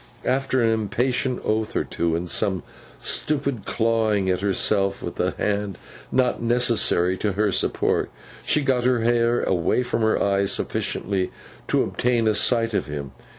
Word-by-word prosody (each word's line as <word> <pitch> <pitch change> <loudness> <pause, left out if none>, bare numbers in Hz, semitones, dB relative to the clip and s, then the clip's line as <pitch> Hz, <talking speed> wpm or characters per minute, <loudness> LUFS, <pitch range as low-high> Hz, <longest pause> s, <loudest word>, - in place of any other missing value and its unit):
After 130 -1 +1
an 115 - +3
impatient 125 +4 -1
oath 110 0 -1
or - - +1
two, 85 -1 -1
and 85 +2 -3
some 95 -1 0 0.3
stupid 140 -7 -1
clawing 110 -4 +1
of 90 0 -1
herself 100 0 +1
with - - -6
the - - 0
hand 100 -2 -1 0.3
not 130 -2 +1
necessary 115 -6 +2
to 105 -2 0
her 105 +1 +1
support, - - +1 0.3
she 150 - +1
got 130 -3 +1
her 125 -2 +2
hair 120 +1 +2
away 90 +7 +1
from 115 -2 -2
her 110 0 +2
eyes 100 0 +1
sufficiently 95 -1 -1 0.4
to - - +2
obtain 120 -2 0
a 110 - +3
sight 115 +2 +2
of - - -1
him. 70 -2 -5
110 Hz, 155 wpm, -23 LUFS, 100-120 Hz, 0.4 s, an